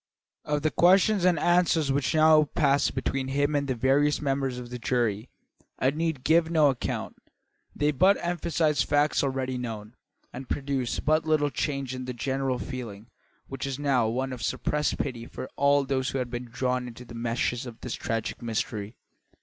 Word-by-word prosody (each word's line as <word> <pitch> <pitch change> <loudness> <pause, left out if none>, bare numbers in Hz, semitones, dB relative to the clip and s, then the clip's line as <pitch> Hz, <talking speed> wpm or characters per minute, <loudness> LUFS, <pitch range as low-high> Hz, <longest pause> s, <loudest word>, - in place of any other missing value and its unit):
Of 150 -1 -1
the 155 - +2
questions 190 +2 +4
and 180 -2 +4
answers 170 -3 +2
which 135 +1 0
now 155 -1 +6
passed 140 -1 +1
between 135 -1 -2
him 145 +2 0
and 140 -1 0
the 130 - -1
various 140 +5 +2
members 135 -3 -1
of 125 -1 -8
the 125 - -5
jury 115 -2 -1 0.5
I 130 - +2
need 160 -3 -2
give 165 +1 +3
no 155 -4 +4
account. 130 - -4 0.6
They 150 +1 +2
but 185 +8 +4
emphasised 170 -3 0
facts 145 0 +2
already 130 -2 -2
known, 110 -2 -6 0.4
and 130 +1 -8
produced 135 -3 -2
but 155 +2 +2
little 150 -2 +2
change 140 -3 -2
in 130 0 -5
the 125 - -4
general 135 +1 -1
feeling, 115 -5 -7 0.4
which 135 0 -5
was 135 -1 -3
now 135 -5 +2
one 130 +3 -2
of 125 - -7
suppressed 150 0 -1
pity 120 -4 -4
for 130 - -7
all 140 0 +3
who 130 0 -1
had 125 -2 -3
been 120 0 -4
drawn 125 +1 -2
into 120 +1 -10
the 120 - -11
meshes 120 +1 -2
of 115 -2 -11
this 125 - -4
tragic 115 +1 -3
mystery. 110 -2 -3
135 Hz, 175 wpm, -27 LUFS, 125-150 Hz, 0.6 s, now